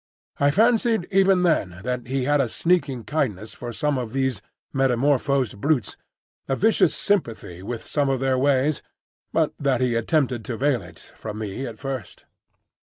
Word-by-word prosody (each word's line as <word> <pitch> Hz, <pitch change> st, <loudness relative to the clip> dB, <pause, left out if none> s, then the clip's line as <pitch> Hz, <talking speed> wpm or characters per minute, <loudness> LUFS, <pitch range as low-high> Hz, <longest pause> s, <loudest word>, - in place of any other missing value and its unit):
I 145 Hz, -, +4 dB
fancied 225 Hz, -, +3 dB
even 190 Hz, -1 st, +4 dB
then 95 Hz, -, +1 dB
that 125 Hz, -1 st, -3 dB
he 135 Hz, +1 st, -1 dB
had 145 Hz, +2 st, +3 dB
a 125 Hz, -, -1 dB
sneaking 150 Hz, -6 st, +1 dB
kindness 110 Hz, -9 st, -2 dB
for 120 Hz, -, -7 dB
some 145 Hz, +1 st, 0 dB
of 120 Hz, -2 st, -5 dB
these 130 Hz, -6 st, 0 dB, 0.3 s
metamorphosed 135 Hz, -3 st, +1 dB
brutes, 145 Hz, -5 st, +1 dB, 0.5 s
a 135 Hz, -, +1 dB
vicious 220 Hz, +9 st, +3 dB
sympathy 115 Hz, -, -1 dB
with 115 Hz, +4 st, -6 dB
some 145 Hz, -2 st, 0 dB
of 135 Hz, -1 st, +1 dB
their 130 Hz, -1 st, +1 dB
ways, 140 Hz, +1 st, +2 dB, 0.5 s
but -, -, +1 dB
that 135 Hz, -3 st, +1 dB
he 125 Hz, -2 st, +1 dB
attempted 125 Hz, 0 st, +1 dB
to 120 Hz, -, -4 dB
veil 135 Hz, -3 st, +1 dB
it 90 Hz, -, -13 dB
from 105 Hz, -1 st, -9 dB
me 110 Hz, +5 st, -4 dB
at 115 Hz, -2 st, -8 dB
first. 130 Hz, -4 st, -6 dB
135 Hz, 165 wpm, -24 LUFS, 120-145 Hz, 0.5 s, I